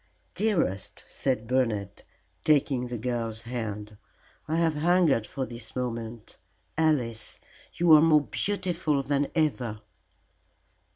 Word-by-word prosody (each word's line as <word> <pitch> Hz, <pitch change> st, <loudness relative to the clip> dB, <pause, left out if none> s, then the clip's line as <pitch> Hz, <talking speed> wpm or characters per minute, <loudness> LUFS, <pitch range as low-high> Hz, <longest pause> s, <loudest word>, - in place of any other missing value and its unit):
"Dearest," 170 Hz, -, -1 dB
said 125 Hz, -5 st, -2 dB
Bernard, 110 Hz, -5 st, -1 dB, 0.4 s
taking 135 Hz, -4 st, +2 dB
the 120 Hz, 0 st, -4 dB
girl's 115 Hz, -1 st, -3 dB
hand, 105 Hz, -3 st, -5 dB, 0.5 s
"I 155 Hz, -, 0 dB
have 165 Hz, -1 st, +2 dB
hungered 155 Hz, -7 st, +3 dB
for 135 Hz, -2 st, -3 dB
this 115 Hz, -2 st, -9 dB
moment. 115 Hz, -3 st, -5 dB, 0.4 s
Alice, 130 Hz, -9 st, 0 dB, 0.4 s
you 170 Hz, -2 st, +5 dB
are 155 Hz, -, +9 dB
more 155 Hz, -2 st, +6 dB
beautiful 175 Hz, -7 st, -1 dB
than 140 Hz, +1 st, +1 dB
ever." 125 Hz, -9 st, 0 dB
130 Hz, 110 wpm, -27 LUFS, 115-155 Hz, 0.5 s, are